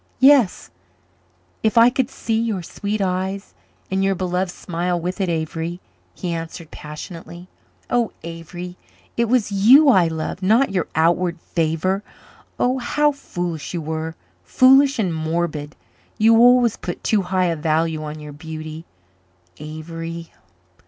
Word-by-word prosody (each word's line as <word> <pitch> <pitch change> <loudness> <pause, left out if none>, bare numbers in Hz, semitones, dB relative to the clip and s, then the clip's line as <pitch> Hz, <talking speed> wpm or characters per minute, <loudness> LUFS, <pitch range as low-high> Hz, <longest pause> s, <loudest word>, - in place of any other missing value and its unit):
"Yes 265 -6 +4 0.9
if 220 +1 +1
I 235 +2 +7
could 260 0 0
see 225 -4 -2
your 215 -6 -2
sweet 205 +5 -3
eyes 190 +1 -2 0.4
and 190 0 +1
your 195 0 +2
beloved 180 0 -1
smile 175 0 -2
with 180 +4 -3
it, 190 - 0
Avery," 165 +1 -3 0.4
he 175 -2 -3
answered 165 0 -6
passionately. 170 +3 -9 0.4
"Oh, 240 -2 +1
Avery, 175 +2 -8 0.4
it 235 - +2
was 230 -2 +1
you 250 +10 +7
I 185 -9 +5
loved 160 +3 -4
not 220 +6 +3
your 185 -3 -1
outward 170 +2 +2
favor. 165 +4 -1 0.6
Oh, 255 +1 +1
how 295 +4 +2
foolish 175 - -5
you 170 - -2
were 160 +1 -4 0.3
foolish 270 +2 +5
and 190 -7 0
morbid! 160 -2 -2 0.4
You 225 +1 +5
always 245 -1 +5
put 175 - -6
too 215 -2 +2
high 185 0 0
a 170 -1 +1
value 160 +1 0
on 150 0 -5 0.2
beauty, 160 0 -7 0.7
Avery. 165 +2 -7
180 Hz, 135 wpm, -21 LUFS, 165-215 Hz, 0.9 s, I